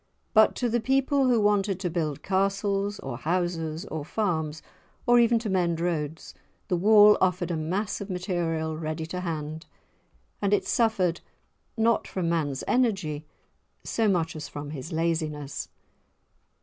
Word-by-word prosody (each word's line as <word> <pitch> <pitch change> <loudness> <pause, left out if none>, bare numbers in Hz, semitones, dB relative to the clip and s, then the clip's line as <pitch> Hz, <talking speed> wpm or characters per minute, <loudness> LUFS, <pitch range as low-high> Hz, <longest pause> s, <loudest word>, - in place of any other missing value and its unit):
But 220 -1 +5
to 245 - 0
the 240 +1 +1
people 270 +3 +2
who 240 -2 +4
wanted 205 -2 +2
to 180 - -1
build 155 -4 -2
castles 200 +1 0
or 135 -3 -5
houses 165 - -2
or 155 -6 -5
farms, 160 -4 -2 0.4
or 240 0 +6
even 235 0 +4
to 225 0 -3
mend 175 -4 +1
roads, 160 -2 -3 0.4
the 180 - +2
wall 210 +3 +6
offered 180 -1 +1
a - - 0
mass 185 +8 -2
of 200 - -6
material 170 -4 -2
ready 155 0 -4
to 180 +3 -5
hand, 160 -2 -5 0.7
and 200 0 +3
it - - -2
suffered 195 -7 +1 0.6
not 230 +1 +2
from 180 -3 -2
man's 145 -5 -1
energy 195 - 0 0.6
so 225 -1 0
much 170 -5 +1
as 155 - -6
from 145 0 -7
his 150 +3 -7
laziness. 160 -3 -2
180 Hz, 150 wpm, -27 LUFS, 160-205 Hz, 0.7 s, or